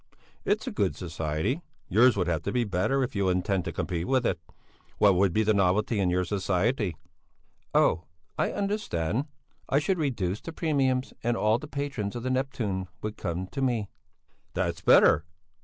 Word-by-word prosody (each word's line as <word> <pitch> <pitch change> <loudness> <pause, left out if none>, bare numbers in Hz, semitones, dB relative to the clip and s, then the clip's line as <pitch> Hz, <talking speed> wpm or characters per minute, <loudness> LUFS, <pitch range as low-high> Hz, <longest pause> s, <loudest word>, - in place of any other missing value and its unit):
It's - - +1
a - - -3
good - - 0
society. 80 - -2 0.3
Yours 115 +3 +5
would 90 - +1
have 80 -2 0
to - - -1
be 125 -1 +1
better 105 +7 +1
if 125 - -4
you 100 -2 +1
intend 90 0 0
to - - -2
compete 85 -1 -3
with 130 -2 +2
it. 90 - 0 0.6
What 100 -2 +5
would 95 +1 +3
be 110 +5 +2
the 110 0 +3
novelty 100 +3 +2
in 95 -2 +2
your 90 +1 +1
society?" 100 - 0 0.8
"Oh! 85 - +3 0.3
I - - 0
understand! 140 - -1 0.4
I 135 - +3
should 175 +5 +1
reduce 105 - -1
the 165 - -7
premiums 135 -6 0
and 120 0 0
all 110 +2 +2
the 150 - -8
patrons 140 -8 -3
of 120 - -5
the 130 - -1
'Neptune' 120 -8 -1 0.2
would 110 0 -3
come 90 0 -3
to 135 - -4
me." 120 -6 0 0.7
"That's - - -1
better! - - +6
105 Hz, 175 wpm, -28 LUFS, 90-130 Hz, 0.8 s, better